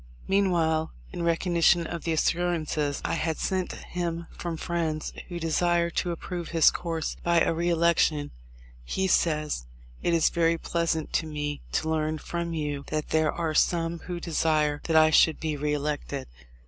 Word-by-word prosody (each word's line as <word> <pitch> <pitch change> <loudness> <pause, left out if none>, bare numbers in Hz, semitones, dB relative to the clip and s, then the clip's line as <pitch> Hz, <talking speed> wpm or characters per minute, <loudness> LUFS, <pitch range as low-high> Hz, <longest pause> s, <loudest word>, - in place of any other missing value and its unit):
Meanwhile, 170 -5 +2 0.2
in - - -4
recognition 170 0 +3
of 170 0 -5
the 165 - 0
assurances 160 -3 0
I - - 0
had 160 -1 -1
sent 185 -2 -1
him 170 -1 -4
from 170 -2 -4
friends 160 -2 -2
who 175 -2 -5
desired 170 +1 +1
to 180 - +1
approve 175 0 -4
his 165 -2 +5
course 165 -2 -3
by 170 -1 +3
a - - +2
re 170 +2 0
election, 165 -3 +2 0.5
he 190 - -1
says: 150 - +1 0.3
"It 170 - +2
is 165 - +3
very 165 -1 +2
pleasant 165 -1 -1
to 160 - +1
me 150 -1 -4
to 160 - 0
learn 155 0 0
from 170 +1 -4
you 145 -2 -3
that 155 -1 -3
there 160 -1 +2
are 165 -2 -2
some 165 +1 +1
who 175 +1 -5
desire 155 -3 +1
that 165 - 0
I 155 0 +6
should 160 0 +5
be 155 -2 -2
re 150 +1 -1
elected. 145 -2 -3
165 Hz, 165 wpm, -27 LUFS, 155-170 Hz, 0.5 s, I